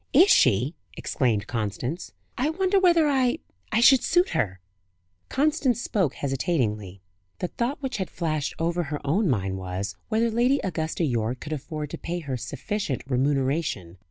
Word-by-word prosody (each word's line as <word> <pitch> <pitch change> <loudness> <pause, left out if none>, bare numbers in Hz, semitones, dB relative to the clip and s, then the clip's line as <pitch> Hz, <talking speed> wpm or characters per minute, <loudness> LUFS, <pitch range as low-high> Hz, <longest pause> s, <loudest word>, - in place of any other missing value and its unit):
"Is 360 +9 +7
she?" 125 - +4 0.2
exclaimed 115 -8 0
Constance. 120 - -3 0.2
"I 270 +5 0
wonder 380 +4 +2
whether 340 -4 +5
I 265 -1 +2 0.4
should 260 +2 +7
suit 355 +2 +3
her?" 95 -5 -1 0.7
Constance 290 -3 +1
spoke 190 - 0
hesitatingly. 110 - -2 0.3
The 180 - -3
thought 270 +4 -3
which 265 -3 -2
had 190 -3 -3
flashed 155 -4 -2
over 170 +1 0
her 150 0 -4
own 175 +7 +2
mind 95 -6 -1
was, 95 +2 -4
whether 225 +1 +2
Lady 245 +5 +3
Augusta 165 -2 -2
Yorke 120 -3 0
could 155 - -5
afford 150 0 -5
to - - -6
pay 175 +1 -3
her 140 -4 -3
sufficient 140 - -3
remuneration. 135 - 0
155 Hz, 150 wpm, -26 LUFS, -, 0.7 s, Is